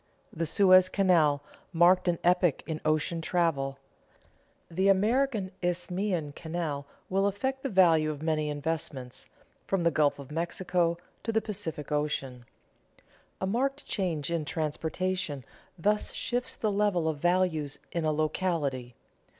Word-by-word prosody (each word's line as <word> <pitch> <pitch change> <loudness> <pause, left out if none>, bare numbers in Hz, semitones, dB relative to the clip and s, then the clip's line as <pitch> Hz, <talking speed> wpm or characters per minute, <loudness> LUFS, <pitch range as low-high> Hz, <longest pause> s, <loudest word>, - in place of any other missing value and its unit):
The 165 0 -2
Suez 185 +1 +6
Canal 165 -8 +3 0.3
marked 180 +2 +4
an 175 -1 +2
epoch 175 -3 +3
in 160 -2 -4
ocean 155 +2 +1
travel. 155 -6 0 0.9
The 185 +3 0
American 215 +1 +2
Isthmian 180 -2 -1
Canal 160 -3 -4 0.2
will 195 +1 +2
affect 265 +7 -2
the 275 - -2
value 165 -6 +4
of 150 0 -5
many 155 -2 0
investments, 145 -4 -4 0.4
from 195 -3 0
the 170 - +3
Gulf 150 -2 +2
of 140 0 -10
Mexico 170 +1 0 0.2
to 225 - -2
the 220 - +3
Pacific 165 -9 -5
Coast. 150 -1 0 1.2
A - - -1
marked 270 +8 -1
change 170 -7 -2
in 165 -2 0
transportation 160 -1 -2 0.3
thus 210 +4 +1
shifts 245 +1 -2
the 215 - -1
level 200 -5 +1
of 155 -2 -1
values 175 -4 +1
in 170 - -2
a 155 - +2
locality. 150 -6 -1
170 Hz, 135 wpm, -29 LUFS, 155-190 Hz, 1.2 s, Suez